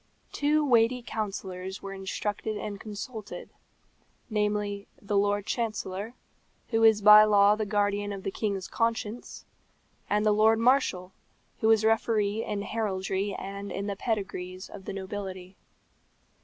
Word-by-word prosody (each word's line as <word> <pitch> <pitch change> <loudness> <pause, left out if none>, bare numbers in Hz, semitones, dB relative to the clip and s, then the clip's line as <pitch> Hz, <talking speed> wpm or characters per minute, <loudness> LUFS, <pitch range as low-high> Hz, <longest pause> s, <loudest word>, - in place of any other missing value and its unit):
Two 300 +1 +2
weighty 240 -1 +3
counsellors 190 -3 -5
were 195 0 -6
instructed 205 +2 -3
and 205 -1 -5
consulted 215 0 -7 0.8
namely, 210 -1 -1
the 205 0 -3
Lord 205 0 +2
Chancellor, 215 -1 -3 0.5
who 225 -1 +1
is 220 -2 +5
by 210 0 +10
law 205 -1 +5
the 215 -1 -3
guardian 205 0 0
of 195 -1 -6
the 195 - -2
king's 200 -3 -2
conscience; 230 0 -3 0.6
and 210 +1 +1
the 215 - +5
Lord 215 +2 +4
Marshal, 225 -7 +2 0.5
who 220 - +2
is 220 -1 +4
referee 220 -1 +1
in 205 -1 -3
Heraldry 195 -2 -2
and 200 +1 -6
in 200 - -3
the 200 -1 -3
pedigrees 190 -4 -4
of 190 - -10
the - - -5
nobility. 190 -1 -6
205 Hz, 135 wpm, -28 LUFS, 195-220 Hz, 0.8 s, by